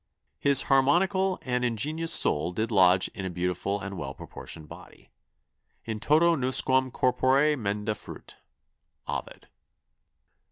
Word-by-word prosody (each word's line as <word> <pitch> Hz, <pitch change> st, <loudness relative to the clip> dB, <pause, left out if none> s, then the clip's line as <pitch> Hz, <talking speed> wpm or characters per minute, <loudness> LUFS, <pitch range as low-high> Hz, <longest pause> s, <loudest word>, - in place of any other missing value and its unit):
His 140 Hz, -2 st, +4 dB
harmonicall 180 Hz, +8 st, +2 dB
and 125 Hz, -1 st, -1 dB
ingeniose 150 Hz, +8 st, -1 dB
soul 85 Hz, -, +2 dB
did 110 Hz, +4 st, -2 dB
lodge 95 Hz, -2 st, +4 dB
in 95 Hz, -, -8 dB
a 95 Hz, -, -3 dB
beautiful 90 Hz, +3 st, -2 dB
and 100 Hz, -2 st, -6 dB
well 70 Hz, -1 st, -6 dB
proportioned 80 Hz, -1 st, -10 dB
body: -, -, -15 dB, 0.7 s
'In 110 Hz, -1 st, -4 dB
toto 165 Hz, +7 st, +3 dB
nusquam 130 Hz, -1 st, +2 dB
corpore 135 Hz, +4 st, +2 dB
menda 105 Hz, -3 st, -2 dB
fuit.' -, -, -12 dB, 0.7 s
Ovid." -, -, -6 dB
125 Hz, 120 wpm, -27 LUFS, 100-145 Hz, 0.7 s, His